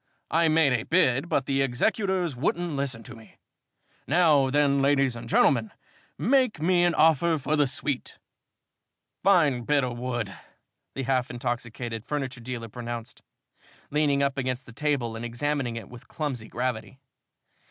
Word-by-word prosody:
I 165 +1 +3
made 155 -3 +4
a 120 - +1
bid 160 -1 +2
but 135 - +1
the 135 0 +1
executors 180 - 0
wouldn't 170 +6 -1
listen 135 -5 -2
to 120 - -10
me. 110 -1 -17 0.7
Now 150 -4 +4
then, 140 0 +2
ladies 135 -2 +2
and 115 0 -8
gentlemen, 115 -4 +3 0.5
make 255 - +2
me 175 +2 +3
an 175 - +2
offer 160 +1 +4
for 150 +2 -1
the 145 -2 +3
suite." 135 0 -4 1.1
"Fine 150 -11 +3
bit 145 0 +2
o' 125 -1 -2
wood," 120 -4 -3 0.6
the 135 - -3
half 130 -1 0
intoxicated 120 -2 -4
furniture 135 -3 -4
dealer 120 -1 -5
pronounced, 120 0 -7 0.7
leaning 145 -1 +2
up 140 0 0
against 130 0 -3
the 120 - -13
table 130 -4 -1
and 115 - -6
examining 120 +1 -2
it 115 -4 -7
with 120 -1 -13
clumsy 135 -8 -4
gravity. 125 +1 -3
135 Hz, 150 wpm, -26 LUFS, 120-150 Hz, 1.1 s, made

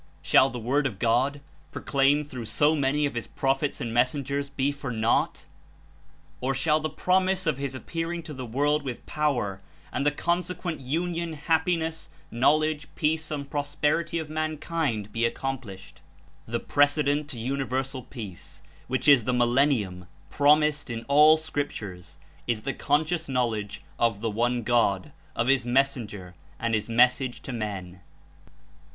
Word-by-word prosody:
Shall 135 - +5
the 125 - -6
Word 135 +5 +1
of 110 -7 -7
God, 125 +6 +1 0.3
proclaimed 140 +1 +2
through 125 -5 -6
so 150 +7 +3
many 145 +1 +1
of 140 - -2
his 120 -1 -4
prophets 135 +2 -1
and 115 -4 -4
messengers, 140 +3 0
be 140 0 0
for 140 -2 -6
naught? 110 0 0 0.9
Or 130 +2 0
sliall 150 +3 +2
the 155 - -2
promise 185 +4 +1
of 150 -4 0
His 140 -1 -3
appearing 165 +6 -4
to 155 - -8
the 130 -2 -6
world 145 +5 +1
with 130 -4 -6
power, 120 -11 -1 0.3
and - - -1
the 145 - +4
consequent 175 +2 -2
union, 165 +5 -2
happiness, 160 +1 0 0.2
know 125 +6 +4
ledge, 155 -1 -1
peace 160 0 0
and 145 -2 -4
prosperity 150 +4 -1
of 160 -2 -3
mankind 155 -8 -2
be 115 - -2
accom 135 +2 -4
plished? 95 -5 -12 0.5
The 120 +1 -2
precedent 145 +1 +2
to 130 - -5
universal 130 +2 -2
peace, 110 -8 -8 0.2
which 130 +1 -1
Is 135 -6 +7
the 125 - +1
"millennium" 120 -7 +1 0.2
promised 150 0 +3
In 115 -1 -5
all 150 +3 +7
scriptures. 115 - -5 0.3
Is 115 -3 -1
the 135 - -2
conscious 160 +2 0
knowledge 115 -6 -1 0.2
of 115 -3 +2
the 115 -1 -1
One 120 +2 0
God, 110 -5 +1 0.2
of 115 - +1
His 135 -2 +4
Mes 135 +3 +2
senger 105 -7 -8 0.3
and 115 0 -1
His 110 +1 0
Message 125 +2 +3
to 135 - -5
men. 95 -5 -5
135 Hz, 155 wpm, -26 LUFS, 120-150 Hz, 0.9 s, Is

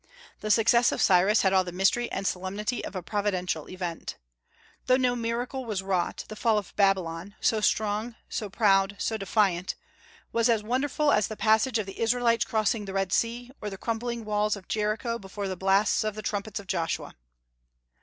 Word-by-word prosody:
The 215 - -4
success 235 +2 +4
of - - -3
Cyrus 195 +3 +4
had 190 -1 +3
all 190 -1 +4
the 180 - -6
mystery 195 +7 +1
and 195 - -3
solemnity 200 +6 -2
of - - -7
a 185 - -4
Providential 185 -5 -2
event. 180 -3 -5 0.7
Though 255 0 +5
no 250 -1 +2
miracle 240 +3 -3
was 210 -5 -3
wrought, 185 -2 -1
the 215 - -8
fall 220 0 +2
of 205 -3 -5
Babylon 190 -2 +1
so 220 -1 +2
strong, 215 +2 0
so 210 - -4
proud, 195 -1 +3
so 225 - -1
defiant 195 -3 +1 0.6
was 230 +1 +2
as 225 -3 +2
wonderful 280 +6 +1
as 210 -5 +3
the 215 - -7
passage 220 +3 +3
of 215 - -2
the 195 - -9
Israelites 230 0 +2
across 215 -3 +1
the 220 -3 -3
Red 195 -1 -1
Sea, 240 +2 -1
or 210 - -3
the 195 - -7
crumbling 230 +1 -3
walls 210 0 +1
of 195 -3 -12
Jericho 220 +2 -1
before 195 +1 -5
the 190 - -3
blasts 195 +4 +2
of 215 -1 -2
the 215 - -6
trumpets 205 0 -3
of 200 - -10
Joshua. 170 -3 -2
210 Hz, 185 wpm, -27 LUFS, 195-230 Hz, 0.7 s, Though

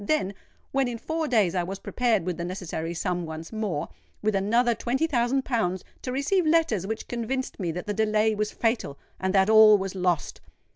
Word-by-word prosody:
Then, 200 -5 0 0.4
when 270 -1 +1
in 240 -1 -4
four 320 +6 -2
days 215 - +3
I 180 - +1
was 190 +3 -4
prepared 225 -4 0
with 180 -2 -2
the 170 - -3
necessary 175 -2 -4
sum 180 0 -1
once 160 +4 -7
more—with 210 +1 -3
another 230 +5 +2
twenty 260 +7 0
thousand 265 -2 +1
pounds—to 220 +1 -2
receive 285 +9 +1
letters 310 - +2
which 220 +1 -4
convinced 245 +2 -3
me 175 -4 -1
that 180 - -5
the 210 - -2
delay 215 0 +2
was 210 0 -1
fatal, 225 - -1 0.2
and 190 0 0
that 190 0 +5
all 215 -1 +8
was 195 -1 -4
lost! 180 -4 -1
215 Hz, 185 wpm, -26 LUFS, 185-245 Hz, 0.4 s, all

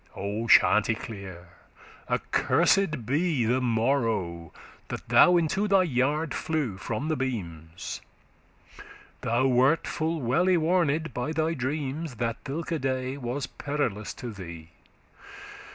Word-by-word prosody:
O 105 +4 -3
Chanticleer! 100 -6 +2 0.6
accursed 155 - +2
be 145 0 +1
the 125 +3 +1
morrow 110 - 0 0.4
That - - -6
thou 180 0 +7
into 175 +5 +1
thy 195 -2 +4
yard 150 +1 0
flew 150 -11 -2
from 115 +7 -3
the 155 - +1
beams;* 85 - -5
*rafters - - -22 0.4
Thou 120 +3 +1
wert 130 +5 +3
full 160 0 -2
well 140 +8 +1
y 185 -1 +4
warned 165 -2 +1
by 125 +6 -2
thy 160 +1 0
dreams 145 +1 -3
That 115 0 -3
thilke 160 +2 -3
day 130 0 -1
was 130 +1 -3
perilous 125 -8 -3
to 125 -3 -6
thee. 85 -5 -9
130 Hz, 120 wpm, -27 LUFS, 115-155 Hz, 0.6 s, thou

